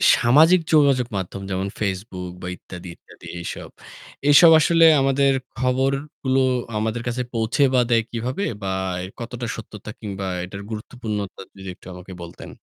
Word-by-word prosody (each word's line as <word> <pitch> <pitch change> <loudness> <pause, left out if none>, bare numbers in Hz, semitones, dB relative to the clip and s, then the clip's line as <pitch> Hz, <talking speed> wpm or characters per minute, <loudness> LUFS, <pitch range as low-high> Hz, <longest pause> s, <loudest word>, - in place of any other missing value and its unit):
সামাজিক 155 +9 +5
যোগাযোগ 140 -5 +4
মাধ্যম 95 +1 -5
যেমন 95 +1 -1
Facebook 95 -3 -4
বা 90 - -6
ইত্যাদি, 90 0 -11
ইত্যাদি - - -18
এইসব, 85 - -6 0.6
এসব 165 +3 +8
আসলে 165 +1 +5 0.2
আমাদের 135 0 +3 0.3
খবরগুলো 135 +1 0 0.4
আমাদের 110 +2 -1
কাছে 120 +1 -1
পৌঁছে 115 +4 +1
বা 125 - +4
দেয় 115 -1 +3
কিভাবে? 125 - -3 0.2
বা 95 - -4 0.4
এর 95 - -8
কতটা 120 0 -5
সত্যতা 110 -1 -10
কিংবা 100 -3 -5 0.2
এটার 100 +2 -8
গুরুত্বপূর্ণতা 105 -3 -5 0.2
যদি 95 -1 -8
একটু - - -17
আমাকে 90 +1 -10
বলতেন? 85 +1 -10
115 Hz, 145 wpm, -22 LUFS, 95-135 Hz, 0.6 s, এসব